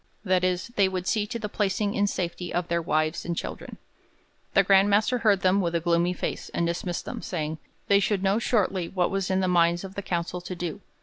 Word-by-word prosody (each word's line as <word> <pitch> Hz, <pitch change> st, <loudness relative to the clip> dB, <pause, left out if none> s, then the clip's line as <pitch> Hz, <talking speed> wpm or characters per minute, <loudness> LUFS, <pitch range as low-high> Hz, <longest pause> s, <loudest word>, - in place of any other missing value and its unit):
That 185 Hz, -1 st, +2 dB
is, 185 Hz, +3 st, 0 dB
they 195 Hz, -2 st, +4 dB
would 185 Hz, -1 st, -3 dB
see 210 Hz, +1 st, 0 dB
to 235 Hz, -, -4 dB
the 215 Hz, -2 st, -4 dB
placing 205 Hz, 0 st, -1 dB
in 205 Hz, 0 st, +2 dB
safety 175 Hz, -2 st, -3 dB
of 175 Hz, 0 st, -2 dB
their 170 Hz, 0 st, +1 dB
wives 155 Hz, 0 st, 0 dB
and 170 Hz, -1 st, -3 dB
children.' -, -, -6 dB, 0.8 s
The 195 Hz, -, +6 dB
Grand 195 Hz, +1 st, +5 dB
Master 215 Hz, +5 st, +2 dB
heard 205 Hz, -4 st, +3 dB
them 190 Hz, +2 st, +3 dB
with 170 Hz, -2 st, -1 dB
a -, -, +3 dB
gloomy 170 Hz, +1 st, +1 dB
face, -, -, -4 dB
and 170 Hz, -, +1 dB
dismissed 170 Hz, +1 st, -3 dB
them, -, -, -5 dB
saying, 155 Hz, -3 st, -3 dB, 0.3 s
they 200 Hz, 0 st, +5 dB
should 200 Hz, -1 st, 0 dB
know 195 Hz, +3 st, +2 dB
shortly 195 Hz, -7 st, 0 dB
what 180 Hz, -2 st, 0 dB
was 195 Hz, -2 st, -1 dB
in 190 Hz, 0 st, +1 dB
the 185 Hz, -, +1 dB
minds 175 Hz, 0 st, +3 dB
of 190 Hz, 0 st, -8 dB
the 200 Hz, -, -4 dB
council 175 Hz, -1 st, -3 dB
to 180 Hz, +1 st, -6 dB
do. 175 Hz, +2 st, -5 dB
185 Hz, 230 wpm, -26 LUFS, 170-200 Hz, 0.8 s, The